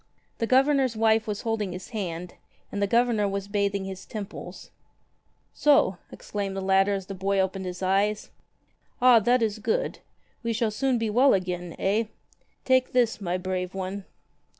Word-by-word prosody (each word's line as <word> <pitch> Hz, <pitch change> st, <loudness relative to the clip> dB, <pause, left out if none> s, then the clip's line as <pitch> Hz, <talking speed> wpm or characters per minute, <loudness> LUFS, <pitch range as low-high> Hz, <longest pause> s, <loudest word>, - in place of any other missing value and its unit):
The 230 Hz, -, 0 dB
Governor's 265 Hz, -1 st, +3 dB
wife 220 Hz, 0 st, +3 dB
was 210 Hz, -1 st, -3 dB
holding 215 Hz, -5 st, -2 dB
his 180 Hz, +1 st, -8 dB
hand, 180 Hz, -5 st, -5 dB, 0.4 s
and 205 Hz, -, -3 dB
the 200 Hz, -, +2 dB
Governor 230 Hz, -2 st, +2 dB
was 200 Hz, 0 st, -3 dB
bathing 200 Hz, -1 st, -1 dB
his 190 Hz, -1 st, -7 dB
temples. 210 Hz, -3 st, -8 dB, 0.8 s
''So!" 280 Hz, -11 st, +3 dB
exclaimed 200 Hz, -2 st, -5 dB
the -, -, -1 dB
latter 195 Hz, +1 st, +3 dB
as 195 Hz, -1 st, -5 dB
the 195 Hz, -, -6 dB
boy 195 Hz, +1 st, 0 dB
opened 190 Hz, 0 st, -1 dB
his 180 Hz, +1 st, -6 dB
eyes. 200 Hz, +3 st, +1 dB, 0.7 s
"Ah, 250 Hz, -2 st, +7 dB
that 240 Hz, +3 st, +2 dB
is 215 Hz, -1 st, -1 dB
good! -, -, -1 dB, 0.4 s
We 230 Hz, -2 st, -1 dB
shall 225 Hz, 0 st, 0 dB
soon 255 Hz, +4 st, +1 dB
be 225 Hz, -2 st, -1 dB
well 255 Hz, +3 st, +5 dB
again, 180 Hz, -2 st, -3 dB
eh? 210 Hz, +4 st, +1 dB, 0.6 s
Take 260 Hz, -1 st, +2 dB
this, 240 Hz, -4 st, +2 dB
my 180 Hz, -1 st, -1 dB
brave 185 Hz, 0 st, -3 dB
one!" 190 Hz, +1 st, -4 dB
205 Hz, 165 wpm, -26 LUFS, 190-230 Hz, 0.8 s, Ah